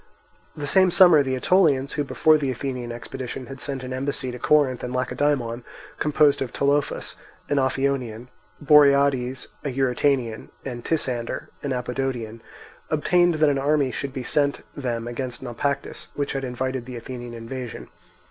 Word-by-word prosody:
The 145 - -4
same 185 +5 +4
summer 175 -4 +7
the 130 -2 -1
Aetolians, 140 -2 +3
who 150 -1 0
before 155 +2 +3
the 140 -2 -1
Athenian 125 -1 -4
expedition 125 +2 -6
had 135 0 -9
sent 135 -3 -4
an 130 0 -5
embassy 130 -1 -2
to 125 - -8
Corinth 140 -2 +3
and 125 - -3
Lacedaemon, 125 -2 0 0.4
composed 150 -1 +3
of 130 -3 -2
Tolophus, 140 +2 0 0.3
an 145 - +2
Ophionian, 130 -3 -1 0.3
Boriades, 140 -3 +4
an 135 -4 -3
Eurytanian, 130 -3 0 0.2
and 120 -3 -5
Tisander, 125 -7 -2
an 140 - -3
Apodotian, 125 -3 -3 0.5
obtained 175 +3 +3
that 155 -1 +4
an 140 - 0
army 140 -1 +2
should 140 +2 -4
be 130 -1 -5
sent 140 +2 +1
them 120 -4 -3
against 125 0 -5
Naupactus, 140 +3 -3
which 145 -1 -2
had 135 -1 -3
invited 130 0 -3
the 125 - -7
Athenian 120 0 -7
invasion. 115 - -7
135 Hz, 150 wpm, -24 LUFS, 125-145 Hz, 0.5 s, summer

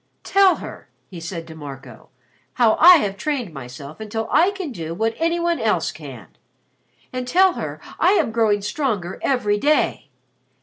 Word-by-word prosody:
"Tell 390 -1 +4
her," - - -10 0.2
he 175 - -8
said 165 0 -6
to 160 - -11
Marco, 140 -4 -11 0.4
"how 230 -3 +4
I 355 +3 +10
have 200 -8 -2
trained 265 - -3
myself 140 - -10
until 220 +1 -4
I 355 - +4
can 385 -7 -5
do 165 -6 -6
what 225 +4 0
any 335 +1 +1
one 340 0 0
else - - 0
can. - - -10 0.9
And 255 -1 -4
tell 370 +6 +4
her - - -6 0.2
I 370 - +4
am 305 - +1
growing 215 -3 +1
stronger 205 - -2
every 210 -6 +1
day. 300 +6 +1
225 Hz, 165 wpm, -21 LUFS, -, 0.9 s, I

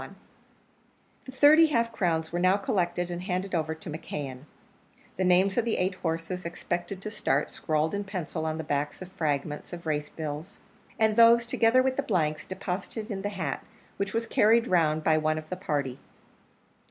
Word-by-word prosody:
The 260 - -8
thirty 295 +5 +7
half 235 -6 +1
crowns 165 -7 0
were 175 - -1
now 185 +2 +4
collected 175 -3 -1
and 175 0 -4
handed 185 +1 -3
over 160 -2 0
to 160 - -13
McKeon; 145 -4 -6 0.7
the 190 - -1
names 185 +4 +4
of - - +2
the 230 - 0
eight 185 +1 +1
horses 165 +1 -3
expected 175 +3 -4
to 215 - -4
start 140 -8 0
scrawled 155 +2 -1
in 205 0 -1
pencil 175 -5 -4
on 155 0 -2
the 160 - -4
backs 145 +4 -2
of 185 - -12
fragments 150 -3 -2
of 170 0 -8
race 150 -2 -1
bills; 155 +1 -6 0.4
and 220 -2 +3
those, 235 0 +7
together 235 +2 +3
with 260 0 0
the - - +2
blanks, 155 - -1
deposited 195 +4 -5
in 195 -1 -3
the 205 - -2
hat, 195 -2 -3 0.3
which 200 -1 -2
was 230 +2 -1
carried 230 +1 +4
round 160 -6 +2
by 155 0 +3
one 155 0 +1
of 155 0 -6
the - - -1
party. 145 -8 -2
180 Hz, 180 wpm, -28 LUFS, 155-205 Hz, 0.7 s, thirty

